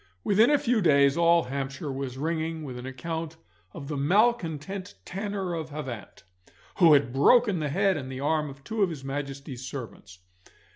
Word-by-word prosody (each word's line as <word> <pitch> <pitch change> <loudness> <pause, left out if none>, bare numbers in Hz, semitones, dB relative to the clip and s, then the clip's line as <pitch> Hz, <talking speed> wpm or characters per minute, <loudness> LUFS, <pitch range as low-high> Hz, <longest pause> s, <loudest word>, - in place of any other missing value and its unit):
Within 215 +5 +4
a 295 - +5
few 240 -4 +1
days 140 -5 +4
all 170 0 +4
Hampshire 140 +3 -4
was 135 -1 -5
ringing 160 +1 -2
with 130 -4 -6
an 125 - -7
account 160 +4 -5 0.3
of 150 -6 -9
the 150 - -3
malcontent 185 - 0
tanner 195 -1 -3
of 160 -2 -4
Havant, 135 -7 -7 0.5
who 170 -5 +7
had 140 -4 +3
broken 205 - +4
the 150 -2 -2
head 195 +4 +2
and 130 -2 -6
the 130 - -6
arm 150 +1 0
of 140 0 -12
two 220 +8 -3
of 195 - +4
his 150 -5 -7
Majesty's 135 -1 -5
servants. 115 -8 -8
155 Hz, 175 wpm, -27 LUFS, 135-180 Hz, 0.5 s, who